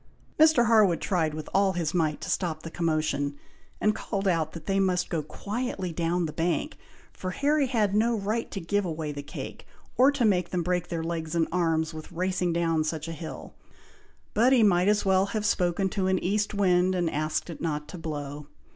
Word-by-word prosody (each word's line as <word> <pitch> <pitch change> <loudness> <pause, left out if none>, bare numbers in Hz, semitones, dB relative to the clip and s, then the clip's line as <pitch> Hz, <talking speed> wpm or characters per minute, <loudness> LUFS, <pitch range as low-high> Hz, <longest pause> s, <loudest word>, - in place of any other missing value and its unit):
Mr. 310 -6 +6
Harwood 215 -6 +4
tried 160 -5 0
with 155 -1 -6
all 195 0 +3
his 170 -3 -2
might 155 -4 +1
to - - -5
stop 160 -4 -2
the 165 - -7
commotion, 155 -4 -1 0.4
and 215 - +3
called 200 -2 -3
out 165 -4 +1
that 165 -2 -9
they 195 0 +1
must 180 -2 +1
go 165 -3 0
quietly 200 - -4
down 170 +1 0
the 155 - -5
bank, 175 - -1 0.4
for 185 - -5
Harry 285 +7 +1
had 215 -6 +1
no 225 +2 +2
right 215 +3 -2
to 195 - -5
give 205 +4 0
away 160 -4 -3
the 145 0 -5
cake, 145 - -8 0.3
or 265 +3 +6
to 280 -4 +1
make 180 -5 +2
them 180 -2 -1
break 180 0 -1
their 165 -1 -3
legs 165 -1 -3
and 165 -1 +2
arms 165 -3 +1
with 155 +2 -9
racing 180 0 0
down 165 -2 +1
such 155 0 -3
a - - -4
hill: 160 0 -8 0.8
but 240 +4 +4
he 250 -4 +5
might 180 -3 +4
as 210 0 +2
well 190 0 +3
have 210 +1 -2
spoken 180 0 +1
to 190 0 -1
an 190 0 +2
east 205 +3 0
wind, 185 -2 +3
and 175 -2 +1
asked 155 0 -1
it 170 - -8
not 150 -2 -2
to 180 - -8
blow. 145 -2 -5
180 Hz, 205 wpm, -27 LUFS, 160-200 Hz, 0.8 s, Mr